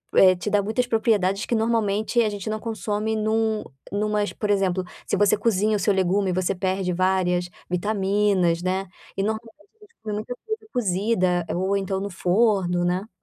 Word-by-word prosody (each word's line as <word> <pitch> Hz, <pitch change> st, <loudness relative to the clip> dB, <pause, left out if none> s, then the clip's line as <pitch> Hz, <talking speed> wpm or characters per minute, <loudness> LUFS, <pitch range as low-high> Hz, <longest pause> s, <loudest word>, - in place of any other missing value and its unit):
eh, 185 Hz, -1 st, +7 dB
te 195 Hz, +4 st, -4 dB
dá 205 Hz, -1 st, +3 dB
muitas 220 Hz, +5 st, 0 dB
propriedades 210 Hz, -4 st, +1 dB
que 235 Hz, -, 0 dB
normalmente 220 Hz, 0 st, +1 dB
a 215 Hz, -, +2 dB
gente 205 Hz, 0 st, -5 dB
não 215 Hz, 0 st, -2 dB
consome 220 Hz, -1 st, -2 dB
em 215 Hz, 0 st, -1 dB
um 220 Hz, -1 st, +1 dB, 0.3 s
em 205 Hz, +1 st, -1 dB
umas, 210 Hz, -1 st, 0 dB
por 210 Hz, -, -3 dB
exemplo, 190 Hz, -2 st, +1 dB, 0.2 s
se -, -, +1 dB
você 205 Hz, 0 st, +4 dB
cozinha 215 Hz, 0 st, +1 dB
o -, -, -4 dB
seu 205 Hz, +1 st, +2 dB
legume 190 Hz, +1 st, +1 dB
você 185 Hz, +1 st, 0 dB
perde 185 Hz, 0 st, -1 dB
várias 180 Hz, -1 st, +1 dB, 0.2 s
vitaminas, 195 Hz, -2 st, +1 dB
né, 190 Hz, +1 st, -1 dB, 0.3 s
e 195 Hz, -, +1 dB
normalmente 220 Hz, +2 st, -3 dB, 0.3 s
a -, -, -15 dB
gente 370 Hz, -, -28 dB
come 210 Hz, -1 st, -3 dB
muita 220 Hz, +4 st, -4 dB
coisa 440 Hz, 0 st, -3 dB
cozida 185 Hz, -5 st, +1 dB
ou 190 Hz, +2 st, 0 dB
então 195 Hz, -1 st, -2 dB
no 200 Hz, +1 st, -4 dB
forno, 180 Hz, -1 st, +2 dB
né. 185 Hz, +5 st, -1 dB
205 Hz, 185 wpm, -24 LUFS, 185-220 Hz, 0.3 s, eh